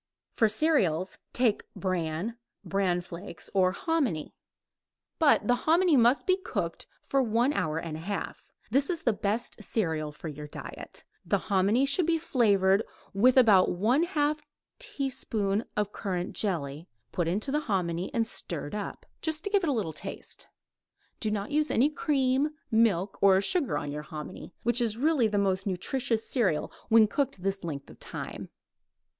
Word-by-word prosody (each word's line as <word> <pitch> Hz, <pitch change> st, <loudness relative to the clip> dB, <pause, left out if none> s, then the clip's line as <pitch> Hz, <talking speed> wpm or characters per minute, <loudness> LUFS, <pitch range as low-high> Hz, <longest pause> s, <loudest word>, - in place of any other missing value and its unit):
For 225 Hz, -, +3 dB
cereals: 205 Hz, -, +1 dB
take 240 Hz, -4 st, +2 dB
bran, 185 Hz, +3 st, -2 dB, 0.3 s
bran 190 Hz, -3 st, +1 dB
flakes 175 Hz, 0 st, -8 dB
or 185 Hz, -2 st, +4 dB
hominy 255 Hz, -, -1 dB, 0.9 s
but 310 Hz, -3 st, +4 dB
the 245 Hz, -, +5 dB, 0.2 s
hominy 340 Hz, -1 st, +5 dB
must 245 Hz, +1 st, +4 dB
be 370 Hz, 0 st, +3 dB
cooked 380 Hz, -, -4 dB, 0.2 s
for 275 Hz, -, +1 dB
one 240 Hz, +3 st, +2 dB
hour 155 Hz, -, -1 dB
and 165 Hz, -1 st, -4 dB
a -, -, -6 dB
half. 195 Hz, +5 st, -5 dB, 0.2 s
That 275 Hz, +4 st, +2 dB
is 335 Hz, -3 st, -2 dB
the 235 Hz, -, +3 dB
best 210 Hz, +3 st, -1 dB
cereal 160 Hz, -8 st, -1 dB
for 150 Hz, +2 st, -8 dB
your 150 Hz, 0 st, -7 dB
diet. -, -, -9 dB, 0.2 s
The -, -, +1 dB
hominy 205 Hz, +6 st, +2 dB
should 305 Hz, +5 st, +2 dB
be 335 Hz, -1 st, +3 dB
flavored 205 Hz, -, +3 dB, 0.3 s
with 245 Hz, +7 st, +4 dB
about 210 Hz, -9 st, +6 dB
one 225 Hz, -, +2 dB
half 300 Hz, -3 st, 0 dB, 0.4 s
teaspoonful 220 Hz, -6 st, -2 dB
of 210 Hz, -1 st, 0 dB
currant 180 Hz, -4 st, -3 dB
jelly, 160 Hz, -5 st, -3 dB, 0.2 s
put 175 Hz, -2 st, -1 dB
into 210 Hz, +10 st, -1 dB
the 300 Hz, -, +2 dB
hominy 180 Hz, -2 st, -1 dB
and 230 Hz, -1 st, +1 dB
stirred 165 Hz, -8 st, -4 dB
up, 210 Hz, -1 st, -5 dB, 0.2 s
just 315 Hz, 0 st, -2 dB
to 405 Hz, -, -3 dB
give 405 Hz, -1 st, +4 dB
it 335 Hz, -, 0 dB
a -, -, +3 dB
little 205 Hz, -, -1 dB
taste. -, -, -5 dB, 0.7 s
Do 215 Hz, -, -1 dB
not 210 Hz, +2 st, -3 dB
use 305 Hz, +1 st, +2 dB
any 275 Hz, +6 st, +3 dB
cream, 275 Hz, -1 st, +1 dB, 0.2 s
milk 210 Hz, -4 st, +2 dB
or 195 Hz, -1 st, +6 dB
sugar 290 Hz, -, 0 dB
on 145 Hz, -, -4 dB
your 150 Hz, +1 st, -4 dB
hominy, 150 Hz, +3 st, -8 dB
which 240 Hz, +1 st, +1 dB
is 225 Hz, -2 st, 0 dB
really 285 Hz, -3 st, +3 dB
the 210 Hz, -1 st, -1 dB
most 195 Hz, -1 st, +1 dB
nutritious 225 Hz, +4 st, -1 dB
cereal 200 Hz, -, 0 dB, 0.2 s
when 225 Hz, -1 st, +7 dB
cooked 240 Hz, -7 st, -2 dB
this 195 Hz, -1 st, -1 dB
length 145 Hz, -5 st, -5 dB
of -, -, -16 dB
time. -, -, -6 dB
210 Hz, 160 wpm, -28 LUFS, 185-270 Hz, 0.9 s, when